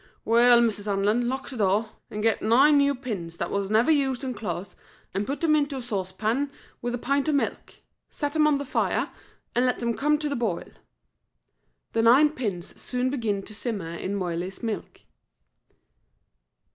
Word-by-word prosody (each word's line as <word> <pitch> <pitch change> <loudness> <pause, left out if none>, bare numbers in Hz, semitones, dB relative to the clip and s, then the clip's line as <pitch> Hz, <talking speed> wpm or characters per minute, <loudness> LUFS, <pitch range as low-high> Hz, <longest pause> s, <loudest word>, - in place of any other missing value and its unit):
"Weel, 235 +1 +6
Mrs. 215 -3 0
Hanlon, 210 +4 +1
lock 265 +1 -4
the 255 - -7
door, 210 +2 +1 0.2
an' 210 - -5
get 225 0 +2
nine 270 +7 +5
new 280 0 +3
pins 195 -10 -5
that 170 - -3
was 200 -1 -1
never 225 +8 +4
used 275 -3 +1
in 260 -1 -2
clothes, 200 -5 -5 0.4
an' 200 +2 -1
put 280 - -3
them 315 -2 +4
into 285 -2 0
a - - -4
saucepan 220 +5 -1 0.3
wi' 240 - -2
the 240 - -2
pint 280 +5 0
o' - - +3
milk. 285 - -2 0.3
Set 290 -1 -3
them 310 -1 +4
on 295 -2 +3
the 285 - -4
fire, - - 0 0.4
an' 245 - +3
let 250 -1 +2
them 235 -1 -1
come 300 +2 +2
to 300 0 -2
the 285 - -2
boil." 220 -8 -2 1.2
The 225 - +2
nine 265 +7 +6
pins 205 - -5
soon 250 0 -1
began 215 -7 -1
to 215 - -10
simmer 205 -6 -4
in 190 +4 -3
Moiley's 180 +1 -3
milk. 225 -2 -4
235 Hz, 180 wpm, -26 LUFS, 205-275 Hz, 1.2 s, Weel